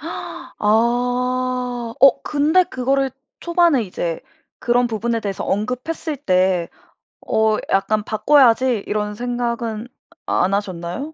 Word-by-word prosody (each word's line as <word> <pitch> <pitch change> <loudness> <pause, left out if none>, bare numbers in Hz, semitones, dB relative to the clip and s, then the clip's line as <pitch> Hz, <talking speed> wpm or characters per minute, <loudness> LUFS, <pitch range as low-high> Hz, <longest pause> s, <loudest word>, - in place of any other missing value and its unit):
아. 325 +3 -8 1.5
어 270 -1 +6
근데 305 +5 +2
그거를 270 0 0 0.3
초반에 340 -7 +3
이제 175 -4 -4 0.4
그런 245 0 +2
부분에 230 0 -2
대해서 200 -2 -4
언급했을 255 - -3
때 185 - +1 0.6
어 220 0 +2 0.2
'약간 210 +2 +1
바꿔야지?' 245 -1 +3
이런 210 0 -2
생각은 235 -1 -3 0.4
안 190 +2 +1
하셨나요? 195 - -4
235 Hz, 225 characters per minute, -20 LUFS, 205-275 Hz, 1.5 s, 어